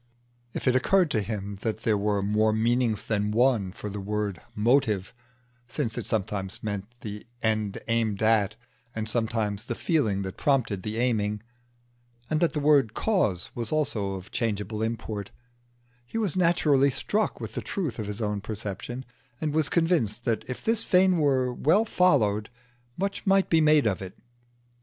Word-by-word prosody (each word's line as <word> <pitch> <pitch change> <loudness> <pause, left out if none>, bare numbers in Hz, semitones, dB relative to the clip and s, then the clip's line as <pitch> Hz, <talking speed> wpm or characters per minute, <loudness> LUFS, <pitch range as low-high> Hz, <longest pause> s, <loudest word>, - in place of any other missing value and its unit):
If - - -4
it 130 - +4
occurred 175 +5 +3
to 110 - +2
him 100 -1 -5
that 110 -2 -2
there 110 - +3
were 100 -1 0
more 105 +2 +2
meanings 115 0 +1
than 105 -1 0
one 115 -4 +2
for 105 - -7
the 105 0 -5
word 105 -2 -2
"motive," 110 -3 +2 0.5
since 120 -2 -3
it 115 -4 -4
sometimes 100 -3 -2
meant 100 -2 -3
the 105 +1 -7 0.2
end 110 -2 0
aimed 115 -3 0
at 110 -2 +3 0.4
and 110 0 -3
sometimes 110 -2 -1
the 120 - -2
feeling 110 - +1
that 95 0 -6
prompted 125 -9 +1
the 105 +3 -4
aiming, 105 -4 0 0.9
and 155 - +2
that 170 - +2
the 150 - -1
word 145 -6 +3
"cause" 105 - 0
was 115 -2 -5
also 115 -10 0
of 95 +1 -8
changeable 110 -1 -2
import, 110 -3 -3 0.7
he 120 - -6
was 210 -7 0
naturally 160 -6 +4
struck 205 +11 -1
with - - -6
the - - -3
truth 155 - -3
of 105 - -3
his 105 +2 -4
own 105 -1 -1
perception, 105 +4 -5 0.3
and 155 -2 -2
was 155 -2 +1
convinced 155 - +1
that 115 -2 0
if 130 - -6
this 225 0 +2
vein 185 -1 +4
were 130 -4 +2
well 185 - +3
followed 110 - +2
out 120 +1 -33 0.4
much 195 +2 -3
might 195 0 +3
be 165 -1 +5
made 155 -2 +5
of 100 -4 0
it. 95 -1 -8
115 Hz, 170 wpm, -27 LUFS, 105-140 Hz, 0.9 s, be